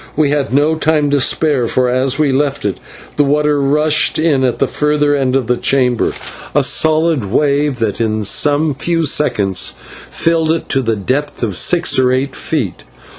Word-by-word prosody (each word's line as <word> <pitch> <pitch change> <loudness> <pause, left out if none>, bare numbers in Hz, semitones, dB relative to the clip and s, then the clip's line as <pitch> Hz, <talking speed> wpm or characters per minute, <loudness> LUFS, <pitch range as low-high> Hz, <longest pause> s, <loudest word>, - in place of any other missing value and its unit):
We 150 -2 +1
had 145 -4 -1
no 145 +4 +2
time 150 -2 +1
to 145 - +2
spare, 135 -2 +1
for 125 +2 0
as 130 +1 0
we 150 -3 +1
left 140 -1 -1
it 100 -3 -2 0.4
the 145 - +4
water 150 0 +1
rushed 150 +2 +1
in 155 -4 +1
at 125 -2 0
the - - +1
further 150 -1 0
end 135 -2 0
of 135 -3 0
the 125 +2 0
chamber, 125 -3 0 0.4
a - - +3
solid 155 -5 +1
wave 140 +5 0
that 115 -2 -2
in 110 -1 -1
some 145 +8 +2
few 165 +4 -1
seconds 100 -10 0 0.3
filled 165 -1 0
it 165 - -3
to 135 - +1
the 115 -3 -1
depth 130 +8 -3
of 105 -5 -2
six 170 - +2
or 125 -1 +2
eight 130 +1 -2
feet. - - -4
140 Hz, 180 wpm, -14 LUFS, 125-150 Hz, 0.4 s, the